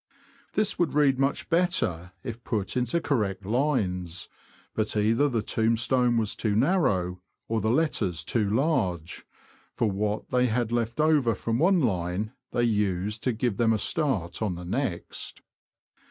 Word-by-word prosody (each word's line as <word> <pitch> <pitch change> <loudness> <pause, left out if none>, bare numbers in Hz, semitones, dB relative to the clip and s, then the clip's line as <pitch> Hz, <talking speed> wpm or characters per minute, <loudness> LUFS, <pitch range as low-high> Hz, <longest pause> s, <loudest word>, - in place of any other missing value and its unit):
This 210 0 0
would 155 -6 +1
read 140 -3 +3
much 135 +1 0
better 165 - +1
if 120 -2 -6
put 105 -2 -2
into 125 +6 +1
correct 105 - -1
lines; 95 - -1 0.4
but 110 0 -1
either 115 +7 +3
the 115 -5 -1
tombstone 115 +2 +2
was 110 -2 0
too 105 -3 -1
narrow, 105 - +1 0.3
or 115 -1 0
the 110 - 0
letters 110 - 0
too 105 +2 0
large, 95 - -1 0.5
for 110 -3 +1
what 105 +2 -2
they 125 0 +3
had 120 0 0
left 115 +2 -1
over 150 -7 +3
from 115 +1 -2
one 180 +2 +4
line 95 - -1 0.2
they 120 - +1
used 105 -1 0
to 130 - +3
give 115 -2 -1
them 115 -1 +3
a - - +2
start 110 - -1
on 100 -5 0
the 90 +1 -8
next. 105 -1 -3
115 Hz, 155 wpm, -27 LUFS, 100-130 Hz, 0.5 s, one